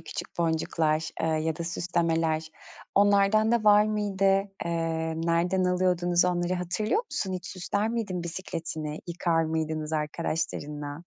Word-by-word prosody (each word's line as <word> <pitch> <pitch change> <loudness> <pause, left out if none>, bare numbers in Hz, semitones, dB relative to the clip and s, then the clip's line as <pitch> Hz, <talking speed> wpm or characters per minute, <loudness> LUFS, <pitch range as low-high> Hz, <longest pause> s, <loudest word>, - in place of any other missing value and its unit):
küçük - - -7
boncuklar, 160 -1 +1
eee, - - +1
ya 160 0 0
da 170 - -4
süslemeler, 165 -2 0 0.5
onlardan 205 +2 +4
da 235 -2 +2
var 210 0 +7
mıydı? 205 -2 -1 0.4
Eee, 165 -1 -1
nereden 170 +3 +1
alıyordunuz 180 -1 +2
onları 175 0 +1
hatırlıyor 185 - 0
musun? 195 - -3
Hiç 185 - -5
süsler 200 +3 -2
miydin 205 -7 -2
bisikletini, 165 -3 -4
yıkar 170 -1 +1
mıydınız 155 -1 -2
arkadaşlarınla? 150 -1 -3
170 Hz, 125 wpm, -27 LUFS, 160-190 Hz, 0.5 s, var